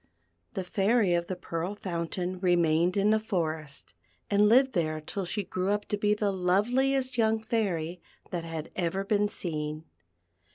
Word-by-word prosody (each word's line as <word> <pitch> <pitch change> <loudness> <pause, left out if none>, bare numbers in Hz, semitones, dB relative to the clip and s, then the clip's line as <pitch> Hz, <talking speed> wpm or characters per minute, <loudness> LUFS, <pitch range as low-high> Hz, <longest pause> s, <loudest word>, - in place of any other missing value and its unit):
The 190 - -1
Fairy 200 +1 +2
of 170 0 0
the 185 - -3
Pearl 175 +2 -4
Fountain 180 -1 -3
remained 175 0 +3
in 200 +2 +4
the 220 - +4
forest, 160 -9 -3 0.4
and 205 +1 +5
lived 260 +3 +5
there 155 -4 0
till 185 +5 -4
she 205 +4 -2
grew 185 +1 -2
up 205 0 0
to - - +1
be 210 0 +2
the 210 -1 0
loveliest 245 +8 +1
young 220 0 +3
Fairy 180 -7 -1 0.3
that 175 -2 -2
had 165 -2 -6
ever 185 +2 -1
been 205 0 +2
seen. 155 -4 -3
185 Hz, 160 wpm, -29 LUFS, 170-210 Hz, 0.4 s, and